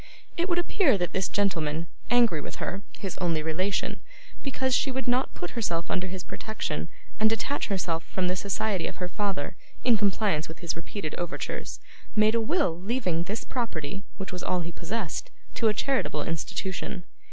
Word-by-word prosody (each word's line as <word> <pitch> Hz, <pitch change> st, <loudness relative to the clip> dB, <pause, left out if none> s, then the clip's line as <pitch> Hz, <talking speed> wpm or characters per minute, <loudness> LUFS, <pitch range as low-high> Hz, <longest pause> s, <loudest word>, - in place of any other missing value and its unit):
It 345 Hz, +2 st, +1 dB
would 345 Hz, -, +3 dB
appear 345 Hz, -, +4 dB
that 175 Hz, -2 st, -1 dB
this 190 Hz, -1 st, +2 dB
gentleman, 165 Hz, -6 st, +1 dB, 0.2 s
angry 235 Hz, -10 st, +5 dB
with -, -, -5 dB
her 195 Hz, -, -2 dB, 0.2 s
(his 195 Hz, -3 st, -4 dB
only 165 Hz, -4 st, +2 dB
relation) 185 Hz, +5 st, 0 dB, 0.4 s
because 265 Hz, -1 st, 0 dB
she 270 Hz, -, +4 dB
would 265 Hz, 0 st, -2 dB
not 250 Hz, +2 st, +2 dB
put 175 Hz, -, -3 dB
herself 170 Hz, -8 st, 0 dB
under 185 Hz, 0 st, +1 dB
his 185 Hz, 0 st, -4 dB
protection, 215 Hz, 0 st, -3 dB, 0.3 s
and 220 Hz, -, +6 dB
detach 250 Hz, +6 st, 0 dB
herself 175 Hz, -5 st, 0 dB
from 185 Hz, -1 st, 0 dB
the 180 Hz, -, +2 dB
society 195 Hz, -1 st, 0 dB
of -, -, -5 dB
her 180 Hz, -, -1 dB
father, 185 Hz, -6 st, -1 dB, 0.3 s
in 240 Hz, -3 st, +6 dB
compliance 200 Hz, -5 st, +2 dB
with 160 Hz, -, -8 dB
his 170 Hz, -2 st, -2 dB
repeated 165 Hz, 0 st, -4 dB
overtures, 175 Hz, 0 st, -3 dB, 0.4 s
made 215 Hz, 0 st, +6 dB
a 230 Hz, -, +3 dB
will 225 Hz, -, +2 dB
leaving 190 Hz, -6 st, +1 dB
this 210 Hz, +5 st, -2 dB
property 195 Hz, -, -2 dB
(which 195 Hz, -1 st, -4 dB
was 180 Hz, 0 st, -4 dB
all 180 Hz, -, +1 dB
he 170 Hz, 0 st, -3 dB
possessed) 190 Hz, +2 st, -3 dB, 0.2 s
to 225 Hz, -, +2 dB
a 215 Hz, -, +5 dB
charitable 255 Hz, -, +1 dB
institution. 180 Hz, +4 st, -2 dB
195 Hz, 175 wpm, -28 LUFS, 170-225 Hz, 0.4 s, and